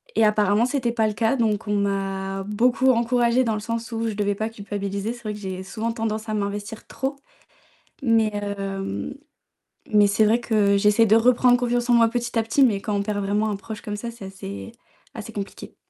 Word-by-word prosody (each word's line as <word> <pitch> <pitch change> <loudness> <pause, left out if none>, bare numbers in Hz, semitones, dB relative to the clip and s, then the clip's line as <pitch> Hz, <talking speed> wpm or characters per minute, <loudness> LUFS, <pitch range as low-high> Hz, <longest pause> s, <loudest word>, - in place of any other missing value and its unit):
Et 220 - +4
apparemment 210 +1 +3
c'était 250 -2 0
pas 220 -2 +1
le 210 - -2
cas 225 +4 +1
donc 215 -3 0
on 210 - +1
m'a 195 -1 -2
beaucoup 245 +6 +2
encouragée 240 +1 +2
dans 225 -3 0
le - - -3
sens 230 +2 -4
où 230 0 -2
je 220 - -2
devais 205 -1 0
pas 220 +2 -2
culpabiliser. 205 0 -4
C'est 240 - -14
vrai 215 -1 -3
que 210 - -8
j'ai 190 -2 -5
souvent 220 +4 -3
tendance 220 -1 -3
à 215 - -1
m'investir 205 +1 -4
trop 270 +1 -3 0.9
mais, 225 -3 +3
hem, 195 - -4 0.8
mais 210 -1 +6
c'est 200 +2 +3
vrai 225 +3 +3
que 210 -4 +2
j'essaie 210 +3 +4
de 215 - +5
reprendre 245 +1 +5
confiance 245 0 -1
en - - +5
moi 230 -1 +6
petit 240 0 -2
à - - +1
petit, 230 +5 +3
mais 215 -6 +3
quand 210 - -3
on 200 - 0
perd 205 0 -2
vraiment 210 +2 0
un 205 - -1
proche 215 +2 -8
comme 210 - -5
ça, 235 +2 -5
c'est 230 -4 -10
assez 100 - -8 0.4
assez - - -7
compliqué. 200 -1 -7
215 Hz, 210 wpm, -23 LUFS, 200-235 Hz, 0.9 s, mais